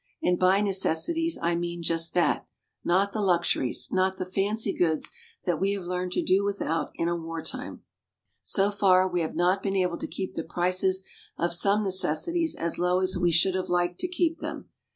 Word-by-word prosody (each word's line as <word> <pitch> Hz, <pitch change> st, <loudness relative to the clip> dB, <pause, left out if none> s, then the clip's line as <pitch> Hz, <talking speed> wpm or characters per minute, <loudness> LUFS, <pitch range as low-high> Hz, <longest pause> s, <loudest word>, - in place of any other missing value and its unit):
And 180 Hz, 0 st, +2 dB
by 185 Hz, +2 st, +4 dB
necessities 210 Hz, -, +1 dB
I 170 Hz, +1 st, +2 dB
mean 170 Hz, 0 st, -3 dB
just 165 Hz, 0 st, 0 dB
that 175 Hz, -, +2 dB, 0.4 s
not 195 Hz, +3 st, +2 dB
the 215 Hz, -, -2 dB
luxuries, 175 Hz, -9 st, +1 dB
not 190 Hz, 0 st, +1 dB
the 185 Hz, -, -3 dB
fancy 200 Hz, +3 st, 0 dB
goods 160 Hz, -3 st, 0 dB, 0.3 s
that 175 Hz, -3 st, 0 dB
we 195 Hz, +1 st, +2 dB
have 200 Hz, -2 st, -4 dB
learned 180 Hz, 0 st, -3 dB
to -, -, 0 dB
do 190 Hz, +2 st, +3 dB
without 165 Hz, -6 st, -1 dB
in 165 Hz, -, -1 dB
wartime. 165 Hz, -, -6 dB, 0.6 s
So 200 Hz, 0 st, +1 dB
far, 190 Hz, -2 st, +4 dB
we 180 Hz, -1 st, -1 dB
have 160 Hz, -, -3 dB
not 180 Hz, +3 st, +2 dB
been 195 Hz, -1 st, -1 dB
able 180 Hz, -2 st, 0 dB
to -, -, -3 dB
keep 190 Hz, -1 st, -5 dB
the 165 Hz, -, -3 dB
prices 185 Hz, +2 st, +1 dB, 0.3 s
of 170 Hz, 0 st, 0 dB
some 200 Hz, +4 st, +3 dB
necessities 195 Hz, -, 0 dB
as 170 Hz, 0 st, -2 dB
low 180 Hz, +1 st, +2 dB
as 185 Hz, 0 st, 0 dB
we 175 Hz, -1 st, +2 dB
should 170 Hz, +3 st, +3 dB
have 185 Hz, 0 st, -2 dB
liked 175 Hz, 0 st, 0 dB
to -, -, 0 dB
keep 345 Hz, -2 st, 0 dB
them. -, -, -6 dB
185 Hz, 190 wpm, -27 LUFS, 175-200 Hz, 0.6 s, by